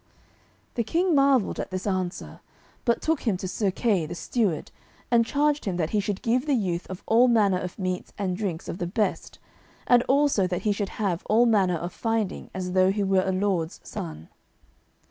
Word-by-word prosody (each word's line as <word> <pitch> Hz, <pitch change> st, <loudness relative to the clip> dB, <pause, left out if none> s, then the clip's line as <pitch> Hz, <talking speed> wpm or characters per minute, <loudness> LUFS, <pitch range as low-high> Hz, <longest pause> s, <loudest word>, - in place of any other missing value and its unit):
The 235 Hz, -, 0 dB
King 345 Hz, -, +1 dB
marvelled 275 Hz, -6 st, +3 dB
at -, -, -3 dB
this 185 Hz, 0 st, -4 dB
answer, 185 Hz, -3 st, -3 dB, 0.5 s
but 235 Hz, -2 st, +1 dB
took 320 Hz, -2 st, +1 dB
him 200 Hz, -5 st, +2 dB
to 185 Hz, -, -5 dB
Sir 195 Hz, +2 st, 0 dB
Kay, 190 Hz, -5 st, 0 dB
the 175 Hz, -, -6 dB
steward, 195 Hz, -5 st, -1 dB, 0.4 s
and 235 Hz, -1 st, +5 dB
charged 295 Hz, +2 st, +1 dB
him 185 Hz, -4 st, -1 dB
that 160 Hz, -3 st, -1 dB
he 210 Hz, -, +2 dB
should 200 Hz, -1 st, -3 dB
give 250 Hz, +5 st, +1 dB
the 285 Hz, -, +3 dB
youth 180 Hz, -6 st, -2 dB
of 185 Hz, -1 st, -7 dB
all 235 Hz, +3 st, +5 dB
manner 205 Hz, -6 st, +3 dB
of 180 Hz, -1 st, -6 dB
meats 185 Hz, -2 st, -3 dB
and 190 Hz, -3 st, -1 dB
drinks 185 Hz, -5 st, -4 dB
of 170 Hz, -, -5 dB
the 175 Hz, -, -2 dB
best, 210 Hz, +4 st, -2 dB, 0.5 s
and 245 Hz, -1 st, +5 dB
also 275 Hz, -8 st, +3 dB
that 180 Hz, -1 st, -3 dB
he 210 Hz, -, +2 dB
should 200 Hz, -1 st, -2 dB
have 190 Hz, -5 st, -1 dB
all 230 Hz, +3 st, +5 dB
manner 195 Hz, -6 st, +3 dB
of 175 Hz, +2 st, -5 dB
finding 225 Hz, -4 st, -2 dB
as 180 Hz, -1 st, -4 dB
though 185 Hz, 0 st, +4 dB
he 205 Hz, +1 st, -1 dB
were 190 Hz, -1 st, +3 dB
a 190 Hz, -, 0 dB
lord's 185 Hz, -4 st, -1 dB
son. 80 Hz, -1 st, -7 dB
200 Hz, 200 wpm, -26 LUFS, 180-230 Hz, 0.5 s, and